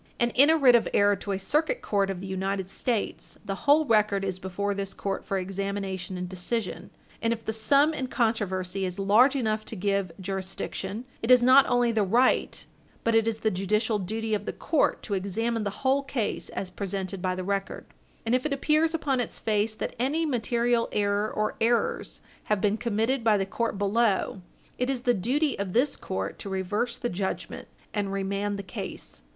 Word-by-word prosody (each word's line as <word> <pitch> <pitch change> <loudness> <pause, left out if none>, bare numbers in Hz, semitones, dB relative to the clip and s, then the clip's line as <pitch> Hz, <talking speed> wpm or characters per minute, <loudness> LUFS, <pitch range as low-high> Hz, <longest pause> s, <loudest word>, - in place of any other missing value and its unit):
And 240 0 +2
in 280 +4 +6
a 320 - +5
writ 265 -5 +6
of 235 - +4
error 205 0 +5
to 200 - -5
a 195 - 0
Circuit 310 - 0
Court 200 -2 +1
of 185 -2 -4
the - - -6
United 190 0 -2
States, 230 +1 -3
the 195 - -2 0.2
whole 310 +2 +6
record 210 -5 +2
is 185 -1 -2
before 195 +2 -2
this 195 -1 -4
court 195 -1 -3
for 195 - -2
examination 195 -1 -3
and 180 0 -4
decision, 185 +3 -3 0.3
and 230 - +1
if 230 -1 -3
the 220 - -1
sum 280 +8 +3
in 265 -4 -3
controversy 195 -6 -1
is 180 -1 -3
large 215 +8 +5
enough 220 -4 0
to 225 - -6
give 200 -2 0
jurisdiction, 190 +3 -4 0.2
it 225 - -3
is 250 -1 +7
not 260 +2 +7
only 245 -1 +3
the 220 -1 +1
right, 235 +6 +2 0.4
but 230 - +2
it 225 0 +3
is 225 -1 -2
the 220 - +2
judicial 210 +4 0
duty 220 +3 -3
of 205 -1 -1
the - - -3
court 315 -1 +1
to 205 - -4
examine 215 +4 -1
the - - 0 0.2
whole 270 +2 +4
case 260 -6 -2
as 185 -2 -5
presented 195 -1 -4
by 185 0 0
the 185 - -4
record; 195 0 -3 0.4
and 225 - +1
if 255 0 +2
it 305 - -1
appears 310 +3 +2
upon 280 -5 0
its 245 - -2
face 215 0 0
that - - -4
any 295 +7 +1
material 240 -3 +1
error 205 +1 +1
or 215 0 -1
errors 240 - 0 0.2
have 210 -1 +1
been 210 +1 +2
committed 230 +3 0
by 220 -2 +4
the 195 - 0
court 225 +2 -2
below, 205 -1 +1 0.4
it 250 +1 0
is 265 -3 -1
the 245 -1 +3
duty 265 - 0
of 195 -2 -3
this 260 +5 +2
court 95 +1 -4
to 200 - -6
reverse 195 +5 -2
the - - -2
judgment 190 -3 -4 0.3
and 205 -2 -1
remand 200 +1 -2
the 200 - -5
case. 180 - -7
215 Hz, 200 wpm, -27 LUFS, 195-240 Hz, 0.4 s, is